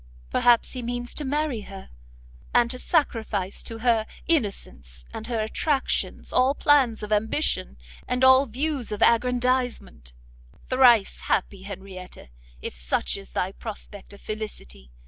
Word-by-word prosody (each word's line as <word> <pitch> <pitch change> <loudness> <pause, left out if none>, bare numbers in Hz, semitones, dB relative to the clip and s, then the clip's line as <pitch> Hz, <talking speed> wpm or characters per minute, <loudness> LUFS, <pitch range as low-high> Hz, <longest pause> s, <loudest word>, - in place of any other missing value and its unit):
Perhaps 240 -1 +4
he 255 - -4
means 245 0 -4
to 300 - -4
marry 290 -4 -1
her, 195 -1 -11 0.6
and 240 -1 +4
to 255 - -4
sacrifice 220 - 0
to 225 - -7
her 225 -2 +2 0.2
innocence 65 - -1
and 220 - -6
her 235 -2 -1
attractions 275 +5 -1
all 260 +2 +3
plans 265 -8 +3
of 210 0 -1
ambition, 210 - 0 0.3
and 250 +1 0
all 260 +1 +7
views 265 0 -2
of 210 +1 0
aggrandizement; 245 - +1 0.6
thrice 245 -5 +5
happy 195 0 -1
Henrietta, 190 - -9 0.3
if - - -4
such - - -1
is 195 0 -10
thy 185 - -1
prospect 205 -1 -9
of 200 - -12
felicity! 210 - -7
225 Hz, 135 wpm, -25 LUFS, 195-255 Hz, 0.6 s, all